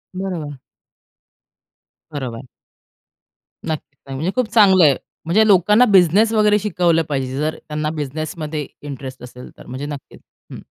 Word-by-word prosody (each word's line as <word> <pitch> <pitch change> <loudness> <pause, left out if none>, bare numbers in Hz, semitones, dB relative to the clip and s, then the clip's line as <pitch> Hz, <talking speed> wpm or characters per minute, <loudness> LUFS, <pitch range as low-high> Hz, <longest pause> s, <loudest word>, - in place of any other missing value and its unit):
बरोबर. 170 -7 -5 1.5
बरोबर. 130 -4 -5 1.2
नक्की. 155 -3 -5
नाही 135 - -6
म्हणजे 165 +7 -2
खूप 255 -2 +1
चांगलं 190 -5 +6
आहे. 140 -3 +5 0.3
म्हणजे 200 +7 +3
लोकांना 210 +4 +5
बिझनेस 195 +4 +5
वगैरे 210 -1 +3
शिकवलं 175 -5 +1
पाहिजे 135 -2 -2
जर 155 +2 -1
त्यांना 150 0 -2
बिझनेस 150 +2 -4
मध्ये 150 -2 -4 0.2
इंटरेस्ट 135 -3 -8
असेल 125 0 -11
तर. - - -14
म्हणजे 130 +3 -6
नक्कीच 145 -2 -9 0.3
हं. - - -8
155 Hz, 135 wpm, -19 LUFS, 140-190 Hz, 1.5 s, चांगलं